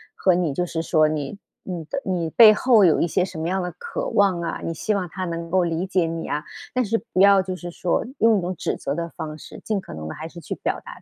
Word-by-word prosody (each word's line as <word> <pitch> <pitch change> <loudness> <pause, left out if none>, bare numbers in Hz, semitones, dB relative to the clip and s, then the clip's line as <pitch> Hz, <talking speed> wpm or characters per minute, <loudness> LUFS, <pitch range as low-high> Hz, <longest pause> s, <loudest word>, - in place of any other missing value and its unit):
和 185 -2 +3
你 170 -5 0
就 175 +6 -1
是 165 -1 -3
说 155 -1 +3
你 150 +3 -3 0.3
你 175 -4 -5
的 275 - -4
你 175 -4 -1
背 220 +2 +9
后 225 -1 +4
有 165 -4 +5
一 170 - +2
些 180 - +1
什 185 -3 -6
么 160 - -2
样 190 +1 0
的 180 - -3
渴 - - -4
望 190 - +2
啊， 170 - -3
你 165 - -2
希 215 +6 -1
望 190 -3 -1
他 185 +3 -6
能 170 -1 -4
够 185 0 +3
理 170 +1 -1
解 185 -2 +1
你 165 0 -4
啊， 150 - -2 0.3
但 255 0 +2
是 225 +1 0 0.2
不 185 - +3
要 200 -1 +7
就 185 0 -4
是 175 -1 -7
说 175 0 0
用 225 -3 +4
一 - - -3
种 180 +1 -2
指 - - -2
责 140 - -3
的 170 +2 -3
方 155 -1 -7
式。 - - -11
尽 215 -2 -1
可 - - -10
能 80 0 -7
的 - - -6
还 160 - -6
是 170 +1 -11
去 - - -5
表 - - -3
达 - - -11
180 Hz, 300 characters per minute, -23 LUFS, 165-195 Hz, 0.3 s, 背